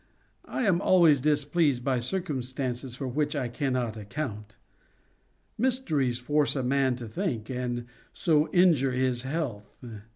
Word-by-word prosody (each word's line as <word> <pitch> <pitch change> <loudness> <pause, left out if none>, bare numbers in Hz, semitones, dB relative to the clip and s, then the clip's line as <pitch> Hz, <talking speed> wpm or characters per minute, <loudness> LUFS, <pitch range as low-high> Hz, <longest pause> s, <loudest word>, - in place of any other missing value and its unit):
I - - -2
am 190 -5 +2
always 170 -8 +5
displeased 145 -2 +2
by 130 -2 +1
circumstances 130 -4 -3
for 135 +1 -4
which 145 +4 -1
I 130 -4 -2
cannot 125 -4 -2
account. 105 -2 -6 1.0
Mysteries 170 - +1
force 145 +5 +1
a 135 - -1
man 130 0 +2
to 120 -2 -7
think, 120 - -3
and 125 -1 -3 0.3
so 155 -2 +2
injure 165 -8 +4
his 125 -1 0
health. 130 -7 -4
135 Hz, 130 wpm, -27 LUFS, 125-155 Hz, 1.0 s, always